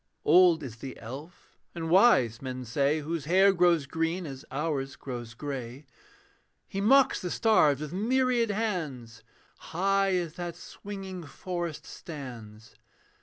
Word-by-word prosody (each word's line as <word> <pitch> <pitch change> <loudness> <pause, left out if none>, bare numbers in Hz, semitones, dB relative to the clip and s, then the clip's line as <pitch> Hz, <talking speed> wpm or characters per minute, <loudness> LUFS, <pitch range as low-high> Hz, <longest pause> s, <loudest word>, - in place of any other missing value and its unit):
Old 175 -3 +6
is 120 -4 -7
the 130 +2 -8
elf, 140 +9 -11 0.2
and 165 -1 -4
wise, 160 - +4
men 130 -1 -5
say, 140 +6 +1
His 160 -1 -3
hair 190 +4 +5
grows 175 -4 +3
green 165 +4 -2
as 135 -3 -8
ours 140 -2 -2
grows 120 -4 -7
grey; 135 0 -6 0.8
He 195 - -4
mocks 270 +6 +4
the 180 - -3
stars 160 - +3
with 155 +1 -5
myriad 240 +3 +1
hands. 160 - -3 0.4
High 195 +2 +1
as 170 -3 -2
that 175 -1 -5
swinging 195 -3 -8
forest 175 +1 -5
stands. 115 -8 -10
165 Hz, 130 wpm, -28 LUFS, 135-185 Hz, 0.8 s, Old